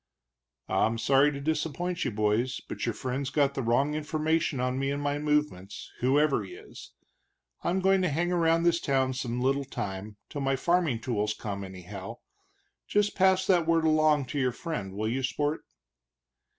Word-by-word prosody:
"I'm 115 Hz, +1 st, +1 dB
sorry 135 Hz, +5 st, +4 dB
to 140 Hz, -, -5 dB
disappoint 160 Hz, +4 st, -2 dB
you, 130 Hz, -, 0 dB
boys, 110 Hz, +3 st, 0 dB
but -, -, -5 dB
your -, -, 0 dB
friend's 130 Hz, +1 st, -3 dB
got 140 Hz, -2 st, +2 dB
the 135 Hz, -, -2 dB
wrong 130 Hz, +5 st, +2 dB
information 155 Hz, -1 st, 0 dB
on 125 Hz, +1 st, -1 dB
me 135 Hz, 0 st, 0 dB
and 140 Hz, +1 st, -1 dB
my 145 Hz, 0 st, -1 dB
movements, 150 Hz, -10 st, -1 dB
whoever 135 Hz, -1 st, +3 dB
he 95 Hz, -, -9 dB
is. -, -, -13 dB, 0.7 s
I'm 185 Hz, +2 st, 0 dB
goin' 190 Hz, 0 st, +4 dB
to 180 Hz, -, +1 dB
hang 170 Hz, +5 st, 0 dB
around 165 Hz, -1 st, +3 dB
this 170 Hz, -1 st, +3 dB
town 130 Hz, -2 st, +1 dB
some 125 Hz, -2 st, -3 dB
little 135 Hz, +2 st, +1 dB
time, 100 Hz, -5 st, -6 dB
till 145 Hz, -, -5 dB
my 135 Hz, 0 st, +1 dB
farming 160 Hz, -4 st, +1 dB
tools 105 Hz, -3 st, -1 dB
come, 100 Hz, -2 st, -5 dB
anyhow. 95 Hz, +3 st, -8 dB, 0.7 s
Just 205 Hz, 0 st, +1 dB
pass 190 Hz, 0 st, +4 dB
that 175 Hz, -4 st, +3 dB
word 165 Hz, -1 st, +3 dB
along 155 Hz, -2 st, +3 dB
to 145 Hz, -, -1 dB
your 130 Hz, -2 st, +2 dB
friend, 120 Hz, -, -5 dB
will 110 Hz, +2 st, -1 dB
you, 125 Hz, +4 st, -1 dB
sport?" 145 Hz, +4 st, -1 dB
140 Hz, 175 wpm, -28 LUFS, 120-160 Hz, 0.7 s, sorry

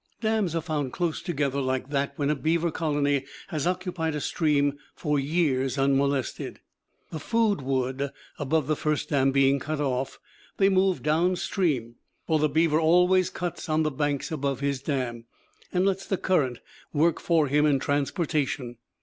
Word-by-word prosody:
Dams 220 Hz, -6 st, 0 dB
are 165 Hz, -, -1 dB
found 150 Hz, -6 st, -2 dB
close 170 Hz, -3 st, -1 dB
together 140 Hz, -5 st, -1 dB
like 130 Hz, +1 st, -2 dB
that 140 Hz, -1 st, 0 dB
when 145 Hz, 0 st, 0 dB
a -, -, +1 dB
beaver 165 Hz, +3 st, 0 dB
colony 145 Hz, -3 st, 0 dB, 0.3 s
has 155 Hz, -3 st, -1 dB
occupied 180 Hz, -3 st, -2 dB
a -, -, -1 dB
stream 145 Hz, -2 st, +1 dB, 0.2 s
for 150 Hz, -3 st, 0 dB
years 135 Hz, -4 st, 0 dB
unmolested. 140 Hz, -1 st, 0 dB, 0.5 s
The 160 Hz, -, -4 dB
food 220 Hz, -1 st, +1 dB
wood 130 Hz, +1 st, -1 dB, 0.3 s
above 145 Hz, +1 st, +1 dB
the 155 Hz, +2 st, +1 dB
first 150 Hz, 0 st, -1 dB
dam 135 Hz, -2 st, +3 dB
being 135 Hz, 0 st, +3 dB
cut 155 Hz, +2 st, -3 dB
off, 135 Hz, -2 st, -1 dB, 0.4 s
they 195 Hz, 0 st, +4 dB
move 190 Hz, -1 st, +2 dB
down 165 Hz, +5 st, +2 dB
stream; 140 Hz, -, -1 dB, 0.3 s
for 160 Hz, -1 st, +2 dB
the 155 Hz, 0 st, +2 dB
beaver 155 Hz, +1 st, +3 dB
always 180 Hz, +3 st, +4 dB
cuts 175 Hz, -1 st, -5 dB
on 155 Hz, 0 st, +2 dB
the 155 Hz, -, 0 dB
banks 145 Hz, +2 st, -1 dB
above 140 Hz, -4 st, -1 dB
his 140 Hz, -2 st, -1 dB
dam, 125 Hz, -5 st, -3 dB, 0.5 s
and 180 Hz, +1 st, +2 dB
lets 195 Hz, 0 st, 0 dB
the 195 Hz, -, 0 dB
current 135 Hz, -12 st, 0 dB, 0.3 s
work 160 Hz, +2 st, +2 dB
for 165 Hz, -3 st, +2 dB
him 150 Hz, +2 st, +3 dB
in 145 Hz, -2 st, +3 dB
transportation. 145 Hz, -3 st, -1 dB
150 Hz, 165 wpm, -26 LUFS, 140-170 Hz, 0.5 s, they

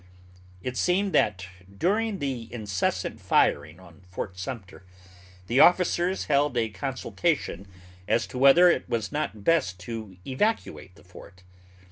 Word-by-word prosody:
It 125 Hz, -1 st, -4 dB
seems 190 Hz, +2 st, +1 dB
that 95 Hz, -, +1 dB, 0.3 s
during 210 Hz, -, 0 dB
the 130 Hz, -7 st, -4 dB
incessant 105 Hz, -6 st, -2 dB
firing 75 Hz, +4 st, +1 dB
on 85 Hz, -1 st, -17 dB
Fort 90 Hz, +1 st, -6 dB
Sumter 95 Hz, -1 st, -8 dB, 0.6 s
the 120 Hz, +7 st, +1 dB
officers 180 Hz, +2 st, +3 dB
held 140 Hz, -3 st, +1 dB
a 115 Hz, -1 st, +1 dB
consultation 95 Hz, -1 st, -2 dB, 0.4 s
as 115 Hz, -, +1 dB
to 125 Hz, -, -7 dB
whether 140 Hz, +7 st, +7 dB
it 175 Hz, -, +1 dB
was 115 Hz, -3 st, -2 dB
not 145 Hz, -9 st, -3 dB
best 95 Hz, -, +1 dB
to 110 Hz, -2 st, -7 dB
evacuate 135 Hz, -, -2 dB
the -, -, -19 dB
fort. 90 Hz, +1 st, -15 dB
120 Hz, 130 wpm, -26 LUFS, -, 0.6 s, whether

